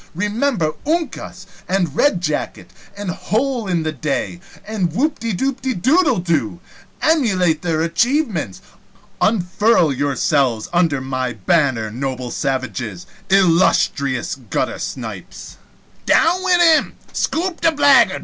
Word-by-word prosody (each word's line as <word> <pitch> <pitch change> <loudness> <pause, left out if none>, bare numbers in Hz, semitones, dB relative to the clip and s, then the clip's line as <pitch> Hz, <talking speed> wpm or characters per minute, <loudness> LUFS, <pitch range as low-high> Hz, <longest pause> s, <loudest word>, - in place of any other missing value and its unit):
Remember 210 - 0
Uncas! 330 +1 -3 0.2
and 180 -6 0
Red 200 -12 +2
jacket! 155 -4 -3 0.3
and 200 -3 -3
Hole 235 +4 -1
in 175 -3 0
the 155 - -1
Day! 155 +4 -3 0.3
and 200 -6 -2
Whoopdedoodledo! 245 - 0 0.4
Emulate 190 - +2
their 160 -2 0
achievements! 210 - 0 0.6
Unfurl 195 -4 +2
yourselves 135 -3 0
under 165 -6 +2
my 130 -1 -3
banner, 115 - +1
noble 130 0 -4
savages, 130 - -3 0.2
illustrious 165 -8 +2 0.2
guttersnipes - - -5 0.2
" - - -33
"Down 350 +3 +3
wid 355 -1 +4
him!" 325 -3 +4 0.2
"Scoop 345 +1 -2
the 330 -1 +4
blaggard!" 285 -3 +4
180 Hz, 100 wpm, -19 LUFS, -, 0.6 s, wid